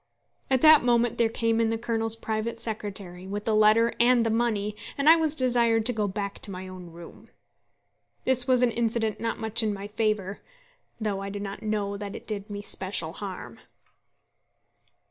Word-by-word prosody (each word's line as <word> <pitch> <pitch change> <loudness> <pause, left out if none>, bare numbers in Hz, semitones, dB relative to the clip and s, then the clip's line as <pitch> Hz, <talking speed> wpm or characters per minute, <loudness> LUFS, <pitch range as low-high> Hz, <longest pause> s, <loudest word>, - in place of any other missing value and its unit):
At 260 -2 +2
that 310 -3 +7
moment 240 -1 +2
there 230 -1 +3
came 230 0 0
in 225 - +2
the 225 - -1
Colonel's 225 -1 +1
private 225 +1 -3
secretary, 200 -5 -5
with 205 +2 -5
the 225 - +1
letter 215 +2 +4
and 240 0 +4
the 225 - +1
money, 215 -3 0 0.2
and 280 +1 0
I 320 - +9
was 320 -2 0
desired 235 -4 +2
to 245 - 0
go 210 -2 -1
back 200 0 -4
to - - -3
my 185 -1 -7
own 185 -1 -10
room. 170 0 -13 0.9
This 255 -1 +3
was 255 -1 +3
an 245 - +3
incident 225 -1 -1
not 230 0 -2
much 220 0 +2
in 215 -1 0
my 200 +1 -7
favour, 210 -2 -2 0.6
though 210 -3 -2
I 195 0 -5
do 200 +1 -6
not 200 0 -6
know 205 -2 -2
that 200 -1 -6
it - - -9
did 210 -1 -5
me 205 0 -6
special 185 -5 -2
harm. 180 - -8
220 Hz, 185 wpm, -26 LUFS, 200-235 Hz, 0.9 s, I